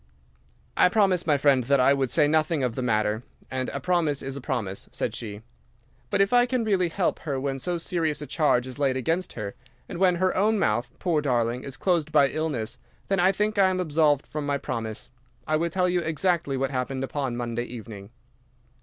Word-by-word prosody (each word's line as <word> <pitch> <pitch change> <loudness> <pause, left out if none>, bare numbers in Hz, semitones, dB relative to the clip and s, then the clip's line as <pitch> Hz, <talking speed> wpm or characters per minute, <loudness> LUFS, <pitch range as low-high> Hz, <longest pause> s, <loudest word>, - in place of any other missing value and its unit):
"'I - - +6
promised 185 -4 +2
my 150 -2 +4
friend 135 -3 +3
that 140 +2 +3
I 130 +2 +5
would 135 -2 0
say 150 +2 +3
nothing 155 -1 +1
of 125 -2 0
the 130 - -4
matter, 110 -2 +1 0.3
and 130 -1 -2
a - - -4
promise 170 -6 0
is 135 0 -4
a 140 - -6
promise,' 110 -9 -4
said - - -3
she; 105 -2 -7 0.7
'but - - 0
if 195 +4 +2
I 245 0 +5
can 250 -2 0
really 190 -5 +1
help 180 +2 -1
her 140 -4 -3
when 135 0 -2
so 175 +5 -2
serious 165 -3 -1
a 150 - -5
charge 145 -6 +2
is 130 +2 -8
laid 135 -2 +1
against 165 +8 -1
her, 100 -3 -5 0.3
and 170 - -6
when 185 -2 +4
her 185 +1 +1
own 215 +3 +2
mouth, 120 - 0
poor 165 -5 0
darling, 120 -3 0
is 140 0 -8
closed 170 -5 0
by 145 -3 +5
illness, 145 -9 -3 0.3
then 195 -1 +2
I 185 +2 +5
think 210 +1 -1
I 190 -1 +6
am 185 0 -1
absolved 150 -4 +2
from 150 -1 -5
my 145 0 0
promise. 115 -4 -5 0.3
I 155 - +1
will 170 +2 0
tell 180 +2 +1
you 180 0 +1
exactly 165 -3 0
what 135 +1 -1
happened 130 0 -2
upon 135 -3 -3
Monday 120 0 -3
evening. 110 -4 -9
145 Hz, 210 wpm, -26 LUFS, 125-175 Hz, 0.7 s, I